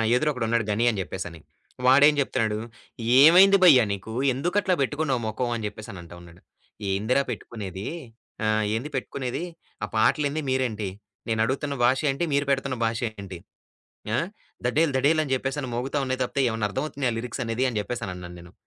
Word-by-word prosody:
ఎదురు 150 +5 +2
ఒకడున్నాడు 115 -3 0
గని 115 +4 +1
అని 110 -4 -2
జెప్పేసని 90 -3 -6 0.5
వాడేం 140 +3 +7
జెప్తున్నాడు, 110 -5 0 0.6
"ఏమైంది 190 +6 +8
భయ్యా 135 -9 +8
నీకు? 100 +2 -5 0.2
ఎందుకు 175 +9 -2
అట్లా 190 -2 +1
బెట్టుకున్నావు 140 -3 0
మొఖం?" 120 +3 -2
అని 110 - -5
జెప్పేసని 105 -3 -9
అంటా 85 0 -12
ఉన్నాడు. 85 +1 -16 0.5
ఏందిరా 110 +8 +1
పెట్టుకునేది 100 -3 -6 0.6
ఆ! - - +2 0.3
ఏంది 125 +7 -3
పెట్టుకునేది 130 +1 -3 0.4
ఆ - - +2
పాటలేంది? 145 +7 +2
మీరేంటి? 120 -6 -1 0.4
నేనడుగుతున్న 130 +6 0
భాష 130 +2 +4
ఏంటి? 135 +5 -1
మీరు 140 0 +2
పెడుతున్న 135 -1 0
భాష 115 0 -1 0.2
ఏంటి? 95 -3 -7 0.8
ఆ! - - +3 0.5
ధడేల్ 150 +4 +2
ధడేల్ 155 +4 +3
అని 135 -3 -3
జెప్పేసని 135 +1 -3
మోగుతా 135 +4 -2
ఉన్నాయి 130 0 -2
తప్పితే, 135 +2 -1
ఏవన్నా 110 -1 -1
అర్ధమవుతున్నయా 130 +1 -2
లిరిక్సనేది 120 +1 -2
అని 115 - -2
జెప్పేసనన్నాను 90 -6 -6
నేను. 85 +1 -14
125 Hz, 150 wpm, -25 LUFS, 110-140 Hz, 0.8 s, ఏమైంది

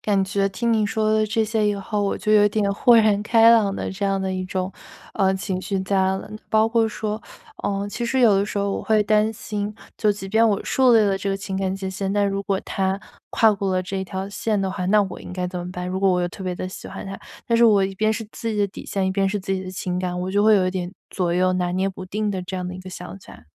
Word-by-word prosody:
感 200 -2 +1
觉 195 0 0
听 230 +4 -1
你 215 -2 +2
说 215 +1 0
的 215 0 +2
这 220 +1 +1
些 215 -1 +1
以 205 - +1
后， 205 +1 -2
我 200 - 0
就 215 - 0
有 210 -1 +6
点 205 -1 0
豁 240 +3 +5
然 210 -2 +4
开 225 +1 +6
朗 210 -4 +4
的 - - -3
这 200 0 -2
样 195 0 +1
的 190 0 -2
一 185 0 -2
种， 185 +1 -3 0.4
呃， 190 -1 +2
情 190 -1 -3
绪 195 0 -2
在 195 +1 -1
了。 190 0 -1 0.2
包 220 0 +4
括 225 -1 +2
说， 215 0 -4 0.4
呃， 200 0 -1
其 235 +3 -3
实 260 +2 +1
有 225 -5 +6
的 200 +1 +1
时 210 - -6
候 200 0 0
我 - - -3
会 215 -1 +3
担 215 +1 +2
心， 210 -1 -4 0.2
就 215 - +3
即 200 -1 -4
便 220 +4 +3
我 205 -1 0
树 255 -2 +4
立 225 - +6
了 200 -2 +2
这 200 - -3
个 195 - 0
情 195 0 -4
感 190 -1 -1
界 190 -1 -4
限， 195 0 -3
但 205 0 +2
如 195 0 -2
果 195 -1 0
他 190 0 -1 0.3
跨 220 -1 +4
过 200 -1 -2
了 185 - +1
这 190 +1 -3
条 190 +1 -5
线 215 0 -1
的 195 -1 -1
话， 185 -1 -3
那 210 +1 +4
我 190 - -6
应 - - -9
该 180 0 -3
怎 180 0 -5
么 175 - -6
办？ 180 0 -5
如 185 +1 -3
果 195 -1 +4
我 180 -1 +1
又 175 - 0
特 190 - -10
别 180 -1 -2
地 185 - -4
喜 185 - -8
欢 - - -7
他， 195 0 -7 0.3
但 230 - +2
是 235 - +5
我 200 -3 +5
一 195 - -4
边 215 +3 +1
是 220 0 -3
自 230 - -5
己 215 - -3
的 205 -1 +2
底 - - -10
线， 195 -1 -1
一 - - +1
边 195 0 +1
是 205 - -1
自 195 0 -3
己 190 0 -2
的 185 - -7
情 180 -1 -3
感， 180 -1 -2
我 185 +1 -3
就 205 +1 +2
会 215 -1 +6
有 185 -1 +2
一 - - 0
点 180 -1 -3 0.2
左 175 -2 -1
右 185 +1 +2
拿 180 -1 0
捏 190 +1 0
不 185 0 -9
定 210 +2 -2
的 190 -2 -3
这 180 +1 -5
样 180 0 -3
的 180 - -5
一 185 - -8
个 185 - -10
想 185 +1 -8
起 - - -16
来。 75 - -14
195 Hz, 320 characters per minute, -23 LUFS, 190-215 Hz, 0.4 s, 有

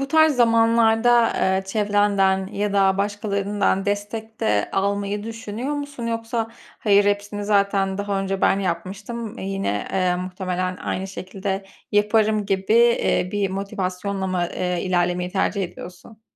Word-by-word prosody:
bu 275 - -2
tarz 315 -1 +4
zamanlarda, 230 0 +4
eee, 190 0 +1
çevrenden 200 -2 +2
ya 205 +1 -2
da 195 -1 +3
başkalarından 200 -1 0
destek 215 +2 -4
de 105 -1 +1
almayı 200 +1 -1
düşünüyor 225 +4 -4
musun? 285 -5 -5
Yoksa 230 0 -2 0.3
hayır, 205 -1 +4
hepsini 205 0 -1
zaten 200 -1 +1
daha 200 -1 -1
önce 195 0 -2
ben 195 - +3
yapmıştım, 200 +6 -4
eee, - - -5
yine, 195 - -2
eee, 185 -2 +1
muhtemelen 185 0 -3
aynı 190 +1 -3
şekilde 195 +1 -4 0.3
yaparım 210 0 +2
gibi, 195 +1 0
eee, 235 -5 +3
bir 200 -2 0
motivasyonla 195 0 -3
mı, 180 -2 -1
eee, 180 -1 -1
ilerlemeyi 180 -1 0
tercih 195 +1 0
ediyorsun? 180 +5 -9
200 Hz, 135 wpm, -22 LUFS, 190-220 Hz, 0.3 s, tarz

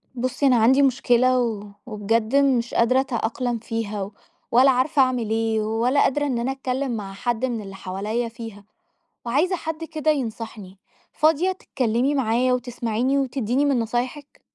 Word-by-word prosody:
بُصي، 255 +3 -1
أنا 255 - +5
عندي 245 +4 +5
مُشكلة 255 -1 +3
و 220 -4 -2 0.2
وبجد 220 +2 -1
مش 265 -4 +2
قادرة 255 +3 +3
أتأقلم 245 -2 -2
فيها، 215 -3 -4 0.4
ولا 260 +3 +6
عارفة 260 +3 +2
أعمل 250 -4 +1
إيه؟ 225 0 0
ولا 230 +6 +1
قادرة 290 +2 +1
إن 255 -4 -1
أنا 245 +3 -1
أتكلم 265 -2 -2
مع 195 -2 -6
حد 240 +4 -1
مِن 235 -3 -3
اللي 195 -1 -9
حواليّا 210 +5 -3
فيها. 225 -3 -10 0.6
وعايزة 300 +10 +1
حد 320 -1 -5
كدا 315 -1 0
يَنَصحني. 225 -7 -5 0.4
فاضية 320 +4 +2
تتكَلمي 260 -6 -1
معايا، 250 0 +2
وتسمعيني، 245 +1 -1
وتديني 265 0 0
مِن 275 -4 +2
نصايحِك؟ 245 +5 -4
245 Hz, 150 wpm, -23 LUFS, 225-270 Hz, 0.6 s, ولا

